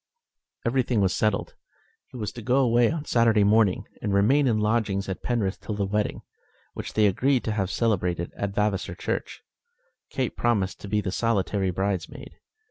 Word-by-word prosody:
Everything 125 Hz, -1 st, +1 dB
was 95 Hz, -1 st, +2 dB
settled. 105 Hz, -2 st, 0 dB, 0.5 s
He -, -, -11 dB
was 105 Hz, -4 st, -3 dB
to 120 Hz, -, -9 dB
go 125 Hz, +3 st, +1 dB
away 120 Hz, -2 st, +4 dB
on 160 Hz, -2 st, -4 dB
Saturday 115 Hz, -3 st, +3 dB
morning, 105 Hz, -2 st, +3 dB, 0.2 s
and 105 Hz, -, -2 dB
remain 130 Hz, +8 st, +4 dB
in 115 Hz, -3 st, +2 dB
lodgings 105 Hz, -2 st, 0 dB
at 95 Hz, -, -4 dB
Penrith 110 Hz, -6 st, -1 dB
till 105 Hz, -, -4 dB
the 100 Hz, -1 st, -1 dB
wedding, 105 Hz, +2 st, -2 dB, 0.5 s
which -, -, -6 dB
they 110 Hz, -, +3 dB
agreed 125 Hz, +6 st, +2 dB
to 110 Hz, -, -2 dB
have 100 Hz, -4 st, -1 dB
celebrated 90 Hz, -7 st, -1 dB
at 100 Hz, -1 st, -3 dB
Vavasor 105 Hz, -2 st, 0 dB
Church. -, -, -4 dB, 0.7 s
Kate 130 Hz, -2 st, -2 dB
promised 100 Hz, -6 st, 0 dB
to -, -, -7 dB
be 105 Hz, +1 st, +1 dB
the 95 Hz, -, -3 dB
solitary 100 Hz, -3 st, 0 dB
bridesmaid. 95 Hz, 0 st, -4 dB
105 Hz, 170 wpm, -25 LUFS, 100-115 Hz, 0.7 s, away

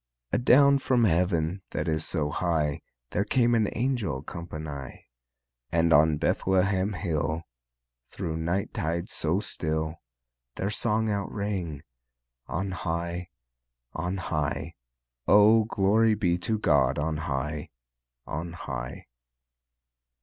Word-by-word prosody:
A'down 140 Hz, +3 st, +6 dB
from 125 Hz, -3 st, +2 dB
Heav'n 90 Hz, -1 st, +1 dB
that -, -, -3 dB
is 80 Hz, -1 st, 0 dB
so 75 Hz, -4 st, -1 dB
high 80 Hz, -5 st, 0 dB, 0.3 s
There 100 Hz, -, +1 dB
came 120 Hz, +2 st, +2 dB
an 110 Hz, -3 st, +3 dB
angel 115 Hz, -, -1 dB
companye, 75 Hz, -6 st, -7 dB, 0.7 s
And 85 Hz, 0 st, +3 dB
on 75 Hz, +1 st, +5 dB
Bethlehem 95 Hz, +4 st, +1 dB
hill 80 Hz, -4 st, -1 dB, 0.6 s
Thro' 90 Hz, -4 st, -5 dB
the 80 Hz, -, -2 dB
night 85 Hz, +5 st, -1 dB
tide 85 Hz, +3 st, -2 dB
so 85 Hz, +4 st, 0 dB
still 80 Hz, -5 st, -2 dB, 0.6 s
Their 100 Hz, +2 st, -2 dB
song 110 Hz, 0 st, +1 dB
out 100 Hz, -1 st, -2 dB
rang: 95 Hz, -8 st, -3 dB, 0.6 s
On 95 Hz, +3 st, -2 dB
high, 85 Hz, 0 st, -3 dB, 0.6 s
On 90 Hz, +3 st, -2 dB
high, 75 Hz, -5 st, -2 dB, 0.5 s
O 105 Hz, +2 st, +6 dB
glory 110 Hz, +1 st, +3 dB
be 90 Hz, -5 st, +1 dB
to 110 Hz, +5 st, 0 dB
God 70 Hz, -9 st, +3 dB
on 75 Hz, +1 st, -1 dB
high, 75 Hz, -1 st, -3 dB, 0.6 s
On 85 Hz, +1 st, -5 dB
high! -, -, -6 dB
85 Hz, 115 wpm, -27 LUFS, 80-100 Hz, 0.7 s, A'down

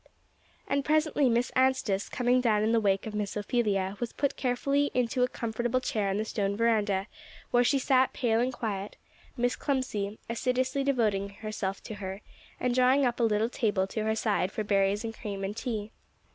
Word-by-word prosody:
And 280 Hz, 0 st, 0 dB
presently 305 Hz, -2 st, +2 dB
Miss 240 Hz, +1 st, +1 dB
Anstice, 260 Hz, -7 st, +2 dB
coming 250 Hz, 0 st, +2 dB
down 215 Hz, -4 st, +2 dB
in 220 Hz, -, +2 dB
the 230 Hz, -, +4 dB
wake 195 Hz, -2 st, +1 dB
of 220 Hz, -, -5 dB
Miss 210 Hz, -1 st, -2 dB
Ophelia, 205 Hz, -3 st, 0 dB
was 240 Hz, -2 st, -3 dB
put 280 Hz, -, -1 dB
carefully 275 Hz, +3 st, +1 dB
into 250 Hz, 0 st, +1 dB
a 250 Hz, -, +4 dB
comfortable 240 Hz, +1 st, -1 dB
chair 215 Hz, -5 st, -1 dB
on 195 Hz, -, 0 dB
the 215 Hz, -, -1 dB
stone 200 Hz, -2 st, -1 dB
veranda, 210 Hz, -4 st, +2 dB, 0.5 s
where 245 Hz, 0 st, +4 dB
she 275 Hz, +3 st, +3 dB
sat 260 Hz, -1 st, +3 dB
pale 230 Hz, -3 st, +1 dB
and 250 Hz, +2 st, +1 dB
quiet, 210 Hz, -5 st, -4 dB, 0.4 s
Miss 245 Hz, 0 st, +1 dB
Clemcy 220 Hz, -7 st, -2 dB
assiduously 255 Hz, +3 st, 0 dB
devoting 215 Hz, -8 st, +1 dB
herself 200 Hz, -1 st, -5 dB
to -, -, -7 dB
her, 190 Hz, +1 st, -5 dB, 0.4 s
and 250 Hz, -1 st, 0 dB
drawing 255 Hz, +2 st, +4 dB
up 245 Hz, -1 st, 0 dB
a -, -, +2 dB
little 220 Hz, 0 st, +2 dB
table 210 Hz, -6 st, 0 dB
to 215 Hz, +3 st, -4 dB
her 220 Hz, 0 st, +1 dB
side 210 Hz, -4 st, 0 dB
for -, -, -3 dB
her 210 Hz, -, -5 dB
berries 200 Hz, +1 st, +2 dB
and 225 Hz, -1 st, -4 dB
cream 200 Hz, -3 st, -6 dB
and 195 Hz, +2 st, -3 dB
tea. 220 Hz, -4 st, -4 dB
225 Hz, 190 wpm, -29 LUFS, 205-255 Hz, 0.5 s, the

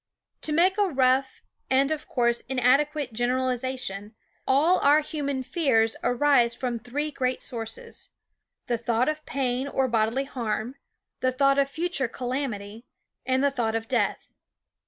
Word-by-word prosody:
yv -, -, -59 dB
To 310 Hz, -, -1 dB
make 360 Hz, +5 st, +3 dB
a 405 Hz, -, +4 dB
rough 265 Hz, -2 st, +1 dB, 0.3 s
and 275 Hz, +2 st, +3 dB
of 310 Hz, -1 st, -3 dB
course 235 Hz, -1 st, +1 dB
inadequate 265 Hz, +1 st, +2 dB
generalization, 250 Hz, -3 st, -2 dB, 0.3 s
all 310 Hz, +7 st, +4 dB
our 290 Hz, +2 st, +5 dB
human 280 Hz, -3 st, -3 dB
fears 250 Hz, -5 st, +2 dB
arise 245 Hz, -1 st, +3 dB
from 245 Hz, -2 st, -3 dB
three 285 Hz, +6 st, -3 dB
great 255 Hz, -2 st, -1 dB
sources: 225 Hz, -2 st, -5 dB, 0.6 s
the 240 Hz, -1 st, -1 dB
thought 235 Hz, +3 st, +1 dB
of 305 Hz, 0 st, -4 dB
pain 260 Hz, -1 st, -1 dB
or 265 Hz, -1 st, 0 dB
bodily 230 Hz, +2 st, +1 dB
harm, 235 Hz, -3 st, -3 dB, 0.5 s
the 255 Hz, -, +1 dB
thought 275 Hz, +1 st, +3 dB
of 275 Hz, 0 st, +2 dB
future 320 Hz, -3 st, -2 dB
calamity, 235 Hz, -3 st, -4 dB, 0.4 s
and 260 Hz, +1 st, +2 dB
the 280 Hz, -, +3 dB
thought 230 Hz, -4 st, -1 dB
of 225 Hz, 0 st, -3 dB
death. -, -, -1 dB
260 Hz, 145 wpm, -26 LUFS, 235-280 Hz, 0.6 s, our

